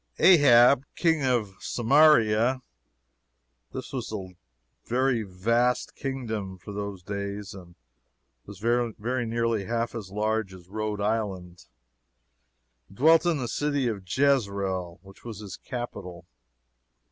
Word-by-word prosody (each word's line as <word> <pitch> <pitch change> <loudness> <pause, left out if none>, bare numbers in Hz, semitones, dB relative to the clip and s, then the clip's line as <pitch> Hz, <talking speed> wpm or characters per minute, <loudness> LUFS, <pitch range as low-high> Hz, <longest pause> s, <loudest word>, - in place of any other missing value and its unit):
Ahab, 135 -6 +6
King 160 -4 +2
of 120 -6 0
Samaria, 125 -2 +3 1.1
(this 130 +1 -7
was 125 -5 -4
a 95 -4 -6 0.5
very 125 -1 +1
vast 115 +6 0
kingdom, 110 -8 -4
for 90 - -10
those 100 -2 -5
days, 100 +1 -5
and 90 -3 -13 0.7
was 100 -1 -10
very 120 +2 -1
nearly 115 -3 -1
half 115 +1 -2
as 105 -5 -6
large 105 -1 -1
as 90 -1 -15
Rhode 105 0 -3
Island) 95 -6 -3 1.2
dwelt 160 - +4
in 170 -3 +2
the 125 -3 -3
city 145 0 -1
of 105 -4 -3
Jezreel, 100 -9 0
which 95 0 -16
was 115 -4 -7
his 100 -4 -8
capital. 90 -8 -7
110 Hz, 115 wpm, -26 LUFS, 100-125 Hz, 1.2 s, Ahab